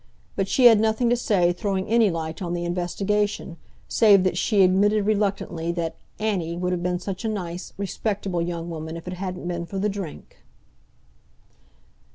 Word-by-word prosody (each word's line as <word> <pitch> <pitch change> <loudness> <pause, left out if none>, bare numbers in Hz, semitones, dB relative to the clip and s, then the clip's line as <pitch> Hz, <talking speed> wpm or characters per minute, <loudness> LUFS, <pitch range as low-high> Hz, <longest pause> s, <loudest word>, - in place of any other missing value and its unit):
But 195 -1 0
she 250 +6 +3
had 225 -3 +9
nothing 220 +2 +2
to - - +5
say 190 -7 +2
throwing 190 0 -2
any 225 -1 +4
light 160 -1 -4
on 175 -2 -3
the 175 0 -3
investigation, 190 +2 -1 0.3
save 205 -4 +5
that 185 -2 +1
she 200 +2 +3
admitted 200 +3 +3
reluctantly 200 -5 0
that 170 -2 -3 0.2
"Anny" 185 -6 -1
would 180 +1 -1
have 180 -1 -1
been 180 0 0
such 185 +2 -5
a 225 - 0
nice, 180 -4 -5
respectable 200 -2 -2
young 170 0 -3
woman 160 -1 -5
if 165 - -11
it 180 - -3
hadn't 180 -1 -5
been 170 -1 -3
for 195 - -6
the 205 +2 +1
drink. 195 -6 -7
185 Hz, 175 wpm, -24 LUFS, 175-205 Hz, 0.3 s, had